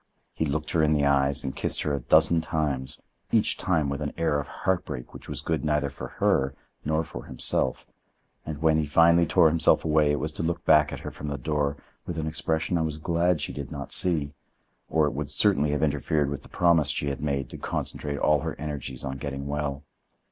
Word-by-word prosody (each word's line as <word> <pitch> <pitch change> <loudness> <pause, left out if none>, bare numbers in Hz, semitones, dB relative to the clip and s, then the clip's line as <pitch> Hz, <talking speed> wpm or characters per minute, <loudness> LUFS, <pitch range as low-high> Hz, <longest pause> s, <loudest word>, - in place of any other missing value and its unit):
He 80 - -1
looked 75 +1 -2
her 80 - +2
in 75 0 +3
the 75 -1 +2
eyes 70 0 +2
and 65 -1 -4
kissed - - -1
her 75 - -1
a 70 - 0
dozen 80 +6 +4
times, 70 -5 -2 0.3
each - - +4
time 80 -6 0
with 70 +1 -3
an 75 - -3
air 80 -3 +1
of 70 - -5
heartbreak 85 -9 -3
which - - -11
was - - -4
good 80 -1 -1
neither 75 -2 0
for 70 - -7
her 70 0 +2 0.3
nor 80 +2 0
for 80 - -9
himself, 65 - 0 0.6
and 75 -1 -6
when 80 -1 +4
he 80 - +1
finally 85 +3 +5
tore 85 0 +5
himself 80 +1 +3
away 75 -1 +3
it 75 - 0
was 75 - -2
to - - -5
look 85 +1 -2
back 75 -1 +5
at - - -6
her - - -6
from 75 - -8
the 70 -1 -3
door 70 +1 -1 0.3
with 85 - -4
an 80 - -2
expression 80 +2 -1
I - - +1
was 80 -1 -2
glad 85 0 +1
she - - -3
did 70 -2 -6
not 70 -1 -6
see, 75 -5 0 0.6
or 80 -2 +3
it 75 - -1
would 70 +1 -4
certainly 75 -3 +3
have 75 +1 0
interfered 75 -1 +1
with 70 -1 -4
the - - -16
promise 85 -4 +3
she 70 -1 0
had 70 -3 -4
made 70 -3 -1
to - - -8
concentrate 70 -1 -3
all 75 +1 +3
her - - -4
energies 70 -4 -5
on 65 0 -4
getting 70 -1 -5
well. 70 -1 -3
75 Hz, 220 wpm, -26 LUFS, 70-80 Hz, 0.6 s, finally